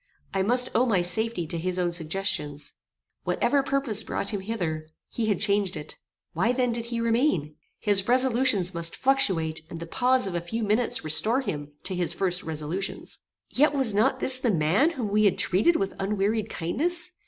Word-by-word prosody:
I 195 - 0
must 245 +5 +3
owe 245 +3 +2
my 195 -6 +2
safety 220 0 +1
to 165 +2 -5
his 180 +2 -1
own 175 -1 0
suggestions. 160 -3 -2 0.5
Whatever 280 - +1
purpose 270 -6 +1
brought 200 - -3
him 205 -3 -3
hither, 170 -7 -4 0.2
he 225 -2 -2
had 205 -5 0
changed 200 -4 0
it. 150 - -9 0.3
Why 205 +9 +1
then 250 -1 0
did 230 0 -3
he 235 -1 -3
remain? 230 - 0 0.2
His 200 -2 +1
resolutions 245 -7 +2
might 170 -1 -1
fluctuate, 190 -14 +1
and 165 - -8
the 170 - -6
pause 250 +8 +1
of 190 - -4
a 175 - -2
few 225 +7 -4
minutes 215 +3 +1
restore 215 - +3
to - - -14
him 145 -1 -8
his 180 -2 -2
first 180 -2 -1
resolutions. 160 +5 -5 0.3
Yet 290 +2 +2
was 260 -6 +3
not 210 +2 +2
this 260 0 +6
the 255 - 0
man 185 - +2
whom 255 -10 -4
we 215 +1 +3
had 195 - +3
treated 210 - +3
with 195 -7 -1
unwearied 210 +2 -1
kindness? 340 - -1
205 Hz, 185 wpm, -26 LUFS, 175-245 Hz, 0.5 s, this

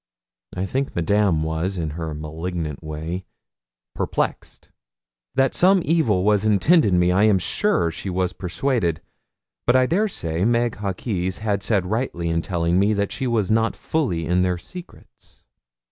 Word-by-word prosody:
I 95 - -2
think 135 +7 -2
Madame 85 -1 +2
was, 80 +4 -2
in 80 -3 -2
her 80 -1 -5
malignant 80 0 -5
way, 80 +4 -5 0.7
perplexed. - - -3 0.7
That 135 0 +2
some 185 0 +4
evil 125 - +2
was 105 0 +3
intended 110 - +4
me 90 0 +3
I 100 +4 +4
am 105 -3 +4
sure 95 - +1
she 95 - -5
was 90 0 -1
persuaded; 90 - -1 0.7
but 120 - +4
I 130 0 +5
dare 195 +10 +1
say 85 - -3
Meg 120 +1 +1
Hawkes 95 -2 -2
had 105 -3 0
said 100 -3 +1
rightly 95 -5 -2
in 85 0 0
telling 85 0 0
me 100 +2 +3
that 100 0 -1
she 135 - -2
was 110 -4 0
not 115 +1 +2
fully 110 - -1
in 90 +2 +2
their 90 -1 +1
secrets. 180 - -13
95 Hz, 155 wpm, -22 LUFS, 85-115 Hz, 0.7 s, I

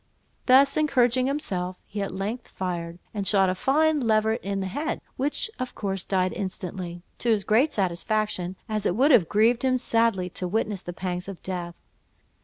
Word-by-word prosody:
Thus 275 +2 +6
encouraging 255 -4 +3
himself, 185 -11 -2
he 205 0 -5
at 195 - -3
length 205 +6 -4
fired, 170 -2 -4 0.2
and 200 -3 -2
shot 195 -2 +4
a - - 0
fine 300 +9 +2
leveret 220 -1 +2
in 195 0 -2
the 190 - -2
head, 290 - -3 0.2
which 290 - +2
of 255 -1 -4
course 195 -3 -2
died 185 -1 +1
instantly, 180 -2 -5 0.2
to 240 - -1
his 215 -3 +2
great 240 +10 +3
satisfaction, 190 0 -1
as 215 -2 -1
it 175 - 0
would 275 +7 +4
have 210 - +5
grieved 230 +4 +3
him 260 -1 +3
sadly 230 -6 +1
to 180 - -2
witness 210 0 -1
the 175 - -6
pangs 180 0 -4
of 195 -3 -7
death. 175 -2 -4
205 Hz, 180 wpm, -26 LUFS, 185-245 Hz, 0.2 s, Thus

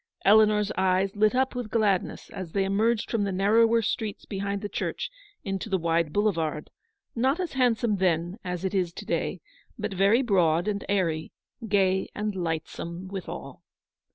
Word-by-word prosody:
Eleanor's 210 0 +5
eyes 190 +1 +2
lit 215 +3 +3
up 260 +1 +1
with 245 -3 -4
gladness 210 -5 0
as 180 -4 -7
they 195 - +2
emerged 215 +4 +1
from 225 -3 +1
the 200 - -1
narrower 225 +4 +3
streets 215 -1 -3
behind 200 0 -3
the - - -1
church - - -3 0.3
into 195 +1 -3
the 190 - +2
wide 165 -2 +1
boulevard, 165 -6 0 0.4
not 265 +7 +1
as 360 -3 -3
hand 250 -4 +3
72 - - -18
some 220 -4 +1
then 175 +2 0
as 180 0 -4
it 190 - -1
is 180 -3 +1
to 210 - -8
day, 170 0 -2 0.4
but 210 -2 -3
very 200 +7 +4
broad 175 -5 +2
and 200 -1 -1
airy, 165 -6 0 0.4
gay 190 -2 +2
and 210 -1 -2
lightsome 170 +1 -4
withal. 190 -3 -7
195 Hz, 170 wpm, -27 LUFS, 180-215 Hz, 0.4 s, Eleanor's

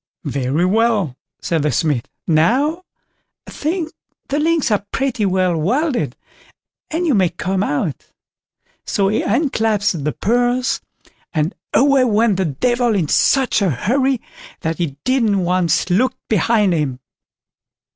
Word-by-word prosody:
"Very 140 +5 0
well!" 205 - +1 0.3
said 165 -3 0
the 150 0 +1
Smith; 140 -2 0 0.2
"now, 255 - +2 0.6
I - - -11
think, 320 +1 -2 0.4
the 285 +2 0
links 320 -4 +1
are 205 -1 +1
pretty 255 -6 0
well 185 -2 +1
welded, 250 - 0 0.7
and 335 +3 -1
you 310 - +2
may 190 -5 +3
come 190 +3 -2
out"; 145 -6 -2 0.8
so 195 -1 0
he 215 - +1
unclasped 220 - 0
the 150 - 0
purse, 245 - 0 0.5
and 155 +5 0 0.2
away 275 -1 +4
went 220 -3 +2
the 190 - 0
Devil 240 - +1
in 165 -7 0
such 265 -5 +3
a 195 - +2
hurry 260 - +1 0.4
that 160 +1 -2
he 150 -6 -2
didn't 230 -7 +2
once 175 -2 +1
look 240 +9 +2
behind 210 -1 +2
him. 145 -6 -1
205 Hz, 135 wpm, -19 LUFS, 170-255 Hz, 0.8 s, away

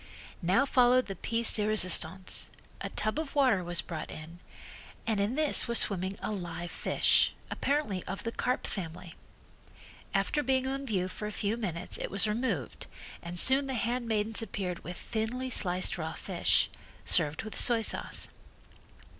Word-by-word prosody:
Now 190 +10 +2
followed 255 -1 +4
the 195 - -6
piece 230 +5 +3
de 210 -1 0
resistance. 185 -3 +1 0.3
A - - -4
tub 215 +7 -2
of 310 -3 -6
water 255 -10 +3
was 175 -1 +1
brought 160 -3 -7
in 165 +3 -10 0.7
and 220 -3 0
in 205 +5 0
this 305 -3 +5
was 235 0 +2
swimming 190 0 +2
a - - -2
live 175 -3 -6
fish, - - +2 0.2
apparently 275 -11 -1
of 195 +1 -6
the 230 - -3
carp 250 +2 -2
family. 175 -2 -7 1.0
After 295 - 0
being 260 -1 0
on 275 +1 -4
view 185 -5 -1
for 210 +3 -6
a - - -5
few 205 +1 -2
minutes 180 -7 -4
it - - -4
was 200 0 +2
removed 210 - -3 0.3
and 175 +1 -5
soon 270 +5 +5
the 265 - -3
handmaidens 230 -2 -1
appeared 185 -5 -5
with 180 - -7
thinly 245 +4 -4
sliced 180 -4 +1
raw 160 0 -4
fish, - - +1 0.3
served 150 +5 +2
with 215 - -8
soy 235 -2 +6
sauce. - - 0
210 Hz, 160 wpm, -29 LUFS, 180-245 Hz, 1.0 s, soy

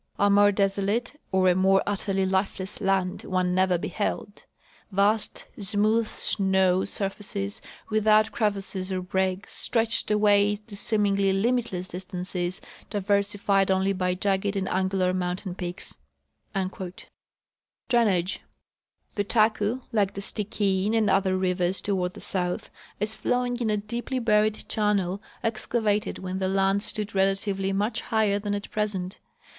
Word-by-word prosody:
A 200 0 +3
more 205 0 +6
desolate 200 +5 0 0.2
or 190 0 +3
a 180 - +6
more 190 +1 +4
utterly 195 -1 0
lifeless 190 +1 -2
land 195 -2 +1
one 185 -1 0
never 185 -1 +3
beheld. 205 +2 -4 0.5
Vast, 205 +3 +1
smooth 215 +3 +2
snow 190 -3 +2
sur 195 0 -2
faces, 200 0 -5 0.3
without 215 0 +4
crevasses 195 -3 -1
or 185 -1 -2
breaks, 190 +1 -1
stretched 225 -2 +1
away 210 -1 +4
to 210 0 -12
seemingly 200 -2 +2
limitless 195 -3 0
distances, 180 0 -4 0.3
diversified 200 -1 +1
only 190 +1 +2
l)y 180 -1 0
jagged 195 +1 0
and 190 -1 -1
angular 185 0 +1
moun 180 -1 -1
tain 185 -1 -6
peaks."* 180 -1 -5 1.9
Drainage. 205 -8 +2 0.7
The 205 - 0
Taku, 220 +2 +2
like 205 -4 +1
the 200 - -4
Stikine 205 0 0
and 220 -2 +3
otlier 190 -1 +2
rivers 180 0 0
toward 185 -3 -1
the - - -9
south, 180 -2 -2 0.3
is 215 +1 -1
flowing 245 +2 -1
in 235 -3 0
a 210 - +2
deeply 235 +5 -3
buried 215 -3 +2
channel 200 -3 0 0.2
excavated 220 -2 0
when 190 0 -4
the 190 - 0
land 195 +1 +2
stood 210 0 -2
relatively 195 0 +1
much 205 +4 0
higher 215 -3 +1
than 205 0 -2
at 205 - -6
present. 195 -3 -2
200 Hz, 135 wpm, -26 LUFS, 190-210 Hz, 1.9 s, more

